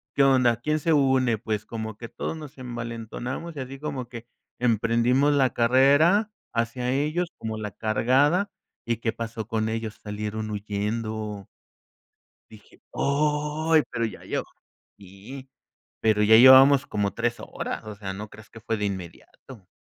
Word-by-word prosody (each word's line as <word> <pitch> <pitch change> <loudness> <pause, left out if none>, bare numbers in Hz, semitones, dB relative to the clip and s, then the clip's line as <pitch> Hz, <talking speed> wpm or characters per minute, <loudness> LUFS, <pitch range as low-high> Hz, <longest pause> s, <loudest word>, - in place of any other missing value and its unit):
¿qué 140 - +4
onda? 130 -4 +4
¿Quién 150 +6 -1
se 160 +2 +1
une?, 130 -5 +3
pues, 110 -1 -3
como 110 -2 -6
que 115 0 -8
todos - - -4
nos 150 -2 -10
envalentonamos, 120 +5 -6
y - - -6
así 135 +1 -8
como 135 -5 -5
que 120 -2 -9 0.3
emprendimos 120 +4 +2
la 135 -3 +3
carrera 145 - +4 0.2
hacia 120 +2 -1
ellos 155 +6 0
como 110 -1 -5
la 105 -1 -5
cargada 140 - +2 0.3
y, 115 -1 -1
¿qué 115 0 -2
pasó 115 -2 -6
con 110 -1 -1
ellos?, 110 -1 -4
salieron 105 +1 -4
huyendo. 105 0 -4 1.0
Dije: 105 -2 -18
"¡Oy!", 150 +2 +1
pero 115 - -1
ya 110 - -7
yo - - -2 0.5
sí, 105 +8 -11 0.5
pero 110 -1 +2
ya 110 +1 +7
llevábamos 130 +3 +8
como 100 -1 -1
3 120 0 -1
horas, - - -5
o 110 -1 -7
sea, 100 -2 -6
no 105 +3 -7
creas 105 +1 -15
que 115 - -12
fue 115 0 -2
de 105 - -3
inmediato. 95 +3 -8
115 Hz, 150 wpm, -25 LUFS, 110-135 Hz, 1.0 s, llevábamos